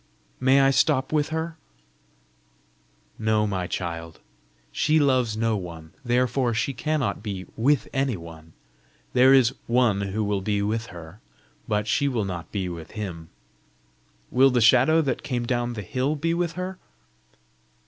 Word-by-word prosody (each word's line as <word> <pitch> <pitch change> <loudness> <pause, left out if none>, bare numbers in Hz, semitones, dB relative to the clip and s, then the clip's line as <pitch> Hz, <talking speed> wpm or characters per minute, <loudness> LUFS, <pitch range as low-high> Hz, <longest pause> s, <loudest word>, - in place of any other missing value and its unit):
"May 135 +1 +4
I 135 0 +5
stop 135 0 +2
with 150 -1 +1
her?" 160 +1 -3 1.6
"No, 110 -1 +2
my 95 -3 -2
child. 85 -3 -5 0.5
She 155 - +2
loves 130 -6 +2
no 115 0 +1
one, 85 -4 -7
therefore 125 0 +1
she 125 +5 -1
cannot 150 0 -1
be 100 -4 -5
WITH 130 +1 +2
any 135 -5 0
one. 80 -1 -12 0.6
There 130 +1 +6
is 130 -2 +5
One 115 -4 +2
who 100 +2 -2
will 100 -1 -1
be 100 +1 0
with 110 +2 -2
her, 85 +3 -11 0.5
but 105 -1 0
she 140 +6 +1
will 120 -6 -1
not 90 -3 -6
be 95 -3 -2
with 85 -2 -8
Him." 85 -7 -6 1.0
"Will 135 +2 +5
the 125 -2 +2
shadow 155 +8 +5
that 135 -3 -2
came 120 -3 -2
down 120 0 -1
the 105 -3 -6
hill 130 - -1
be 165 +3 -1
with 170 -1 -1
her?" 185 +1 -5
115 Hz, 150 wpm, -25 LUFS, 100-135 Hz, 1.6 s, There